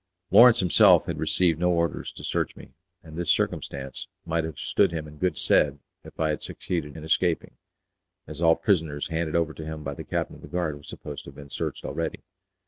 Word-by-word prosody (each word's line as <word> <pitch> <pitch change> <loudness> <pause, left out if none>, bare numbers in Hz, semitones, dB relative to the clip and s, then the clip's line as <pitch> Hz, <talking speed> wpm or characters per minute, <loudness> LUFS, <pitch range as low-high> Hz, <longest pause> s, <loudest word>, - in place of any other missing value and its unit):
Lawrence 120 -2 +8
himself 90 -2 +6
had - - -4
received 85 -4 +2
no 90 +1 +2
orders 85 -1 0
to - - -12
search - - -1
me, - - -13 0.3
and 80 -1 -11
this 85 0 -2
circumstance 70 -1 -1 0.2
might 80 0 0
have 80 -3 -6
stood 100 -3 +2
him 80 -2 -4
in 75 0 -13
good 90 -1 0
stead 70 -1 +3 0.3
if - - -14
I 80 -1 +2
had 75 - -2
succeeded 80 -4 -4
in 80 - -8
escaping, 80 +1 +1 0.7
as 75 +1 -7
all 80 -1 +6
prisoners 80 -8 0
handed 80 -1 -2
over 80 -2 +1
to 80 - -8
him 80 0 -6
by 70 0 -4
the - - -8
captain - - -3
of - - -17
the - - -10
guard 80 -1 -2
were 75 - -12
supposed 75 0 -8
to - - -8
have 70 - -15
been 70 -1 -12
searched - - -4
already. 85 -1 -3
80 Hz, 215 wpm, -26 LUFS, 75-85 Hz, 0.7 s, Lawrence